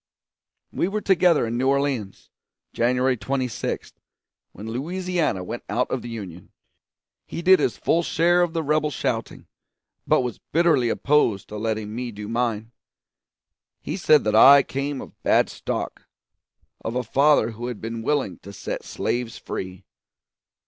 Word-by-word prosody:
We - - 0
were 210 +2 -2
together 180 -7 +3
in 115 +1 -2
New 130 - +1
Orleans, 135 -7 -1 0.4
January 125 +2 +2
26, 130 0 -3 0.6
when 105 +3 -9
Louisiana 165 - -2
went - - -6
out - - 0
of - - -1
the 120 - -8
Union. 95 -7 -8 0.8
He 170 - -6
did 185 +1 +6
his 120 - 0
full 170 - +2
share 175 +1 +2
of 175 -2 0
the 165 -1 -1
rebel 150 +1 +1
shouting, 145 - -3 0.6
but - - +4
was 125 -3 -4
bitterly 155 -8 +2
opposed 120 -8 +1
to 105 - -6
letting 110 -1 -3
me 120 +1 -4
do 105 -1 -8
mine. 115 -1 -2 1.1
He - - -5
said 155 -6 +4
that 105 - 0
I 140 +5 +9
came 140 0 -3
of - - -13
bad - - +3
stock - - -5 0.8
of 115 - -4
a 125 - 0
father 135 -1 +3
who 115 +2 -6
had 125 -4 -5
been 115 0 -5
willing 115 - -1
to 100 - -11
set - - -5
slaves 120 -2 -3
free. 95 +1 -7
125 Hz, 150 wpm, -23 LUFS, 110-150 Hz, 1.1 s, I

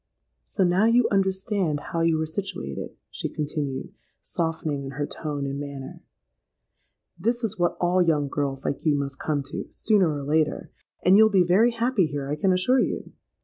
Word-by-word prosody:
—'So - - 0
now 180 +4 +3
you 235 +1 +4
understand 190 -4 0
how 165 - 0
you 165 -1 +2
are 160 - 0
situated,' 175 - -5
she - - -4
continued, 145 -3 -4 0.3
softening 160 -4 -2
in 135 - -6
her 145 +1 -2
tone 145 -2 -4
and 140 0 -3
manner. 140 -2 -7 1.2
'This 235 +2 0
is 215 -5 -2
what 175 0 +1
all 180 +1 +3
young 155 -4 +2
girls 135 -1 -3
like - - -2
you 155 -2 +3
must 140 -1 -4
come 145 -3 -1
to, 140 - -6
sooner 205 -6 +2
or - - -6
later; 155 +2 0 0.3
and 185 +2 +7
you'll 220 0 +7
be 195 -3 +4
very 195 +7 +5
happy 230 -5 +1
here, 145 -2 -4
I 145 - -1
can 185 +5 +2
assure 185 +9 +3
you. - - -2
165 Hz, 180 wpm, -25 LUFS, 145-195 Hz, 1.2 s, and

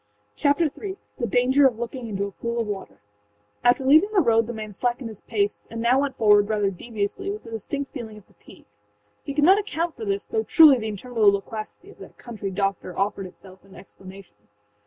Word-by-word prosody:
Chapter 285 +3 +2
III: 380 +6 -5 0.2
The 235 - -1
Danger 260 +5 +4
of 240 -4 -3
Looking 235 +1 -5
into 200 -2 -2
a 200 - -6
Pool 235 +4 -4
of 230 - 0
Water[edit] 205 -2 -6 0.7
After 245 +2 +3
leaving 310 +9 +6
the 415 - +3
road 230 -5 +3
the - - -4
man 215 -2 -7
slackened 245 +4 -2
his 215 - -11
pace, 205 -2 -2
and 230 - -6
now 240 +3 +3
went 280 -1 -3
forward, 210 -2 +4
rather 205 -2 +1
deviously, 210 - -4
with 415 +1 -6
a 230 - -10
distinct 275 +6 -5
feeling 225 -5 -7
of 210 - -16
fatigue. - - -18 0.6
He 280 - -6
could 295 - +2
not 380 +6 +6
account 340 -5 -3
for - - -8
this, 400 0 -2
though 445 - -1
truly 310 - +6
the 220 - -4
interminable 215 0 +2
loquacity 215 - -6
of - - -20
that - - -13
country 215 -5 -6
doctor 195 -2 -3
offered 195 -1 -1
itself 185 +1 -16
in 195 -1 -17
explanation. 190 - -14
230 Hz, 205 wpm, -24 LUFS, 205-280 Hz, 0.7 s, leaving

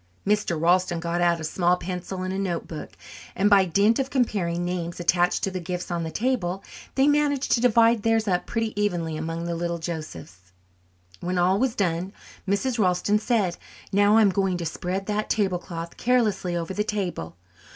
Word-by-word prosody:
Mr. 205 -5 +1
Ralston 175 +1 +2
got 170 +1 -2
out 170 -1 +3
a - - -6
small 175 +3 +1
pencil 180 +1 -5
and 185 0 -3
a 190 - -2
note 180 -4 -2
book, 155 -2 -8 0.4
and 205 +3 +2
by 195 -2 +6
dint 200 +7 +3
of 265 0 -1
comparing 215 -10 0
the 180 - -1
names 170 -1 -4
attached 175 0 +2
to 195 - 0
the 185 - -3
gifts 180 +1 -5
on 170 -1 -1
the 160 - -3
table 195 -4 -1 0.3
they 270 +1 +4
managed 290 -2 +2
to 235 - +3
divide 230 -2 +4
theirs 225 0 +1
up 180 -2 0
pretty 225 -2 -2
evenly 170 -6 -1
among 165 +2 -4
the 170 - -2
little 170 0 -2
Josephs. 90 - -7 0.7
When 180 +1 -2
all 185 +3 +3
was 255 -1 +1
done 185 0 -1 0.3
Mrs. 230 +5 0
Ralston 190 +2 +2
said, 210 -6 0 0.3
"Now, 205 +2 +4
I'm 210 -3 +5
going 190 -1 0
to 170 - -4
spread 185 +4 -3
that 210 +1 -2
tablecloth 180 -5 -2
carelessly 215 -8 +1
over 170 +2 -3
the 210 - 0
table. 175 - -3
185 Hz, 185 wpm, -25 LUFS, 170-210 Hz, 0.7 s, by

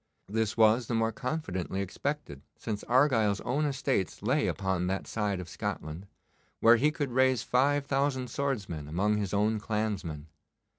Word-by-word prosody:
This 110 +1 -1
was 110 +1 +4
the 120 - -1
more 115 0 +2
confidently 110 - -3
expected 100 - -4 0.2
since 105 -2 -4
Argyle's 120 -6 +3
own 140 +5 0
estates 130 - -1
lay - - +2
upon 95 -2 -1
that 95 +1 -2
side 105 -4 -1
of 90 - -6
Scotland, 80 +2 -5 0.5
where 115 +1 +7
he 145 +6 +3
could 150 -4 -3
raise 130 0 +3
five 140 +3 +2
thousand 135 -3 0
swordsmen 105 - -2
among 100 +7 +1
his 100 -3 -2
own 105 +2 +1
clansmen. 105 -9 -3
110 Hz, 150 wpm, -29 LUFS, 95-130 Hz, 0.5 s, where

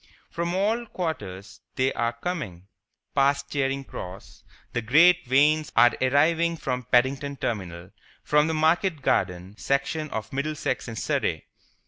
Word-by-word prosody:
From 170 +1 -2
all 220 +5 0
quarters 105 - -5
they 130 0 +1
are 120 0 -1
coming, 115 - -5 0.5
past 140 0 +1
Charing 135 -1 -1
Cross 95 -6 -10 0.3
the 120 - -1
great 165 +10 +5
wains 150 +3 +3
are 120 - +6
arriving 165 +6 +2
from 125 -4 -3
Paddington 135 +3 +2
Terminal, 90 -6 -4 0.3
from 150 +1 +3
the 160 - -1
market 160 0 +1
garden 90 -2 0
section 140 +3 -1
of 110 -1 -5
Middlesex 140 -2 -2
and 115 -2 -6
Surrey. - - -1
140 Hz, 130 wpm, -25 LUFS, 115-160 Hz, 0.5 s, are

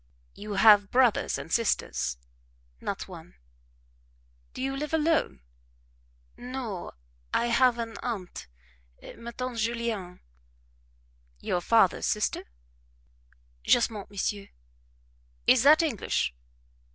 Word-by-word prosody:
"You 210 0 -7
have 205 0 +6
brothers 250 -3 +2
and 160 - -7
sisters?" 220 - 0 0.6
"Not - - -4
one." - - -12 1.2
"Do - - -7
you 270 0 -2
live 300 +3 -2
alone?" 320 - +1 0.9
"No 245 -7 -6 0.4
I 240 - +1
have 250 -1 +4
an 230 -1 -5
aunt 215 -7 -5 0.7
ma 235 0 -8
tante 250 0 -5
Julienne." 225 -5 -3 1.2
"Your 175 - -1
father's 210 -2 +3
sister?" 210 - -1 1.2
"Justement, 220 -4 +1
monsieur." 200 0 -3 1.0
"Is 255 - +5
that 300 +5 +6
English?" 250 - -1
230 Hz, 95 wpm, -27 LUFS, 200-255 Hz, 1.2 s, have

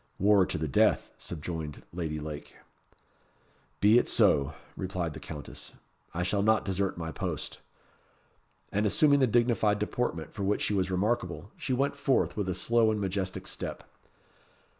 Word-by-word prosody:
"War 100 -1 +5
to - - -2
the 80 0 -2
death," 70 - +3
subjoined 80 -2 -5
Lady 80 -3 -3
Lake. 75 -1 -7 1.3
"Be 105 +4 +7
it - - -1
so," 75 -10 +3 0.2
replied 90 -4 -3
the 75 - -8
Countess. 75 0 -8 0.4
"I 90 - -2
shall 100 +3 +1
not 110 +2 +3
desert 95 -1 -1
my 80 -1 -4
post." - - -4 1.1
And 105 +1 +1
assuming 140 +7 +4
the 130 - +4
dignified 115 -3 +3
deportment 105 -6 -2
for - - -6
which 100 +1 +1
she - - 0
was 95 -2 +1
remarkable, 105 +3 -1
she 130 - -3
went 140 +3 +1
forth 140 -2 +1
with 100 -3 -2
a 90 - -1
slow 115 +3 +3
and 110 -1 0
majestic 95 -1 -2
step. - - -5
100 Hz, 155 wpm, -29 LUFS, 85-110 Hz, 1.3 s, Be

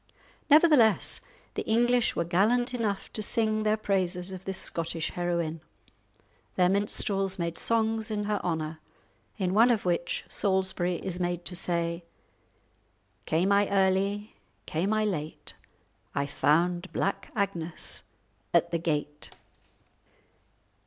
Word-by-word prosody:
Nevertheless, 295 - +5 0.3
the - - -2
English 240 +2 +3
were 170 - +1
gallant 220 +9 +2
enough 215 -5 -2
to 215 - -1
sing 215 0 +2
their 215 0 +2
praises 190 -3 -1
of 185 0 -8
this 190 0 -2
Scottish 165 -2 -2
heroine; 170 -2 -2 0.9
their 180 -1 +4
minstrels 195 -1 +1
made 170 -1 -3
songs 225 -1 +1
in 210 -1 -2
her 205 -1 -1
honour, 160 -2 -2 0.6
in 185 -3 -1
one 230 +4 +6
of 225 -5 +1
which 175 -1 -1
Salisbury 190 -2 0
is 180 +1 -3
made 175 -1 -2
to 180 - -3
say:— 170 -1 0 1.2
"Came 175 +5 +2
I 200 0 +3
early, 200 +2 +1 0.3
came 170 - -1
I 215 0 +2
late, 155 -7 -2 0.6
I 140 - +1
found 175 +6 +1
Black 195 - -2
Agnes 175 -6 -1 0.5
at 170 0 +3
the 170 - 0
gate." 150 -2 -1
190 Hz, 125 wpm, -28 LUFS, 170-210 Hz, 1.2 s, one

